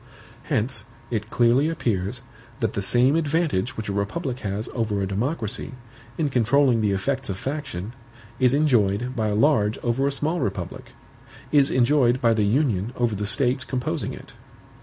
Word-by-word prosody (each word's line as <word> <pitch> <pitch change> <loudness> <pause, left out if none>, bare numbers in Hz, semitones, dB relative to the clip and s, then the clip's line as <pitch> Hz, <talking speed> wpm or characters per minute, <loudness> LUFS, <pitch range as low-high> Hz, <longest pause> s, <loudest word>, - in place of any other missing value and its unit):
Hence, 120 -6 -1 0.3
it 110 -2 -2
clearly 125 +6 +3
appears, 115 - -2 0.4
that 115 -5 -1
the 100 - -2
same 125 +8 +3
advantage 150 - 0
which 110 - -4
a 100 - -2
republic 120 - -2
has 105 +1 -3
over 110 -4 -1
a 100 - 0
democracy, 115 - -3 0.4
in 155 -3 +1
controlling 125 0 +3
the 105 - +2
effects 130 +7 -1
of 95 - -3
faction, 120 - -5 0.5
is 125 +1 +4
enjoyed 125 -4 +2
by 110 -3 0
a 105 - 0
large 110 -4 +3
over 125 +3 +1
a - - +1
small 155 +5 -1
republic, 100 -8 -4 0.6
is 140 -2 +4
enjoyed 130 -1 +3
by 115 -2 +3
the 110 -2 +1
Union 115 -2 +1
over 120 -2 +1
the 105 0 -2
States 125 +4 +2
composing 130 -1 -3
it. - - -11
120 Hz, 160 wpm, -24 LUFS, 105-140 Hz, 0.6 s, is